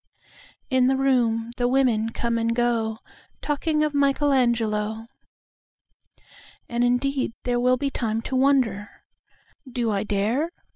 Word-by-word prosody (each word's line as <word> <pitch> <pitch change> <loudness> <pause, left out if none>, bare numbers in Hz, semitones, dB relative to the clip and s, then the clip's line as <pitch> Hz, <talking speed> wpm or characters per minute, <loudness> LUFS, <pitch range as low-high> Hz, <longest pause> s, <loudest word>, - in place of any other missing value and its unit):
In 260 -1 +3
the 265 0 +2
room 235 -4 +1
the 245 -1 +1
women 245 -4 +2
come 235 0 -2
and 230 0 0
goTalking 240 +6 -2
of 300 - -3
Michelangelo.And 235 -6 +1 1.8
indeed 255 +1 0
there 245 -1 0
will 250 +1 +3
be 275 +2 -2
timeTo 225 +1 -3
wonder, 255 -7 +2 0.8
"Do 235 -2 -1
I 200 -1 0
dare?" 215 +9 0
245 Hz, 105 wpm, -24 LUFS, 225-270 Hz, 1.8 s, In